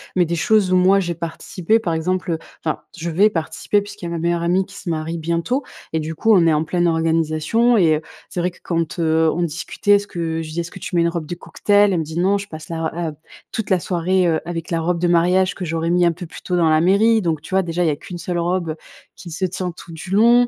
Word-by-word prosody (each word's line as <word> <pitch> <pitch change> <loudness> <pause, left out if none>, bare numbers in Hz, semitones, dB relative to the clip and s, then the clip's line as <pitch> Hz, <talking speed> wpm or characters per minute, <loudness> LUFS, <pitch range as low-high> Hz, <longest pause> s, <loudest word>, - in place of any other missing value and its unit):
mais 180 -1 +4
des 170 +1 -2
choses 195 +2 +2
où - - +4
moi 190 +2 +5
j'ai 175 -2 -1
participé, 170 +5 -1
par 175 -7 -2
exemple, 180 +3 -1
heu 165 - 0 0.3
enfin, 155 - -1 0.2
je 170 0 -3
vais 195 +6 +4
participer 165 +3 -1
puisqu'il 205 -3 -9
y - - -2
a - - -5
ma 170 - -3
meilleure 170 +1 0
amie 180 +3 +2
qui 190 0 -15
se 185 - -7
marie 160 +1 -2
bientôt 170 - -1 0.3
et 160 - +1
du 160 +1 -4
coup 225 +7 +3
on 175 -4 +5
est 160 - +4
en 150 +1 +1
pleine 175 +2 0
organisation 165 +8 +2
et 165 -6 +4
heu, - - -6 0.3
c'est - - -4
vrai 180 +1 0
que 175 - -21
quand, 165 0 -2
heu, 160 0 +3
on 175 - -1
discutait 170 +5 -2
est-ce 205 0 +4
que 165 -3 -3
je 160 - -6
lui 155 - -8
dis: 170 - -3
«Est-ce 170 - -7
que - - -10
tu - - -5
mets 170 - +4
une 170 - +3
robe 170 -2 -4
de 175 - -5
cocktail?». 205 +3 +2
Elle 175 - +1
me - - -1
dit: 160 +2 -4
«Non, 195 +3 +3
je 200 - -6
passe 155 -4 -10
la 165 -1 -3
r - - -5
la 170 -2 -3 0.4
toute 225 -3 -4
la 190 -2 +3
soirée, 180 +1 +1
heu, 160 -2 +2
avec 170 0 -5
la 165 - +1
robe 170 +1 0
de 175 - +1
mariage 180 +2 +3
que 185 - -5
j'aurai 165 0 -1
mis 175 0 +3
un 170 - +4
peu 175 +2 -8
plus 165 - -11
tôt 180 - -2
dans 170 -2 +3
la 155 0 +4
mairie», 215 +5 +4
donc 165 -5 -1
tu 165 - -10
vois, 190 - +4
déjà, 175 0 -1
il 170 - +2
y - - +3
a 150 - 0
qu'1 175 +4 -9
seule 175 0 -3
robe 170 -2 -1 0.4
qui 175 - -10
se 180 +4 -1
tient 180 0 -3
tout 170 0 -13
du 165 +2 -9
long, 235 +4 +5
170 Hz, 285 wpm, -20 LUFS, 165-185 Hz, 0.4 s, moi